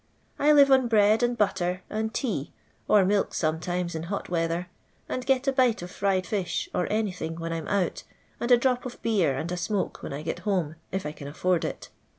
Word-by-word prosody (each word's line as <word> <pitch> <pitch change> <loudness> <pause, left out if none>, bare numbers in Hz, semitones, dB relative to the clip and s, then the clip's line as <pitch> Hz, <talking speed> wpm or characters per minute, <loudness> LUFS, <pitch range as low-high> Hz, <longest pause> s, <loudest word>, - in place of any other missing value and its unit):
I 295 +1 +5
live 280 -2 +7
on 260 -2 +5
bread 215 0 +4
and 240 0 +1
butter 185 -3 0
and 220 +1 -2
tea, 215 - -2 0.4
or 205 -3 +5
milk 200 +1 +1
aometimes 170 +2 -1
in 160 - -3
hot 200 - -3
weather, 170 0 0 0.4
and 255 - -3
get 265 +1 +1
a - - +5
bite 255 -4 +3
<tf 175 - -7
fried 195 -2 0
fish 200 -5 -2
or 180 - -1
anything 190 -7 -2
when 165 0 -4
I - - -1
*m 160 - -6
out, 200 -3 0 0.4
and 240 - -2
a 245 - +8
drop 250 0 +1
of 245 - -10
beer 180 -12 +2
and 165 +5 -3
a 180 - -2
smoke 190 +3 -2
when - - -6
I 140 +2 -5
get 160 - -3
home, 180 -7 -1 0.2
if 190 -2 -3
I 150 - -2
can 145 -2 -9
afford 175 +4 0
it. - - -5
190 Hz, 215 wpm, -27 LUFS, 170-225 Hz, 0.4 s, a